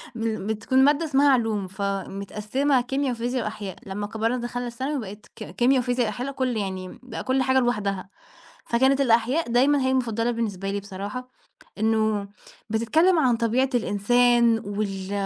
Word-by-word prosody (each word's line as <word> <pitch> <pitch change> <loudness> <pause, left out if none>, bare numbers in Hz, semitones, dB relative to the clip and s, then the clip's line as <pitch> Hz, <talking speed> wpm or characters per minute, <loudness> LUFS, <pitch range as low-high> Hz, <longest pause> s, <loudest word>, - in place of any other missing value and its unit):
مل 225 -3 -3
بتكُون 260 +5 +2
مادة 295 +3 +3
اسمها 285 -1 +3
علوم 225 -6 +1
فمتقسّمة 200 +7 -1
كيميا 270 +2 -1
وفيزيا 245 +1 -2
وأحياء، 210 -3 -5
لمّا 205 +1 -4
كبِرنا 225 +3 -1
دخَلنا 245 0 -4
الثانوي 260 +4 -3
بقِت 210 -1 -8
ك - - -8
كيميا 255 +2 +3
وفيزيا 245 -1 0
وأحياء 245 +5 -3
ل - - -4
كل 255 -3 -1
يعني 190 -2 -3
م - - -12
بقى 255 - -6
كل 260 0 +1
حاجة 260 0 +3
لوحدها، 200 -6 -1 0.6
فكانت 265 +3 +3
الأحياء 245 +4 +2
دايمًا 270 +4 +4
هي 260 0 +1
المفضّلة 235 -2 0
بالنسبة 200 -5 -3
لي 200 0 -2
بصراحة، 205 +6 -7 0.5
إنه 215 -2 +1 0.4
بتتكلّم 315 - +3
عن 250 -6 +3
طبيعة 240 +4 +1
الإنسان 235 +1 +3
وال 200 -2 -4
235 Hz, 155 wpm, -24 LUFS, 205-260 Hz, 0.6 s, دايمًا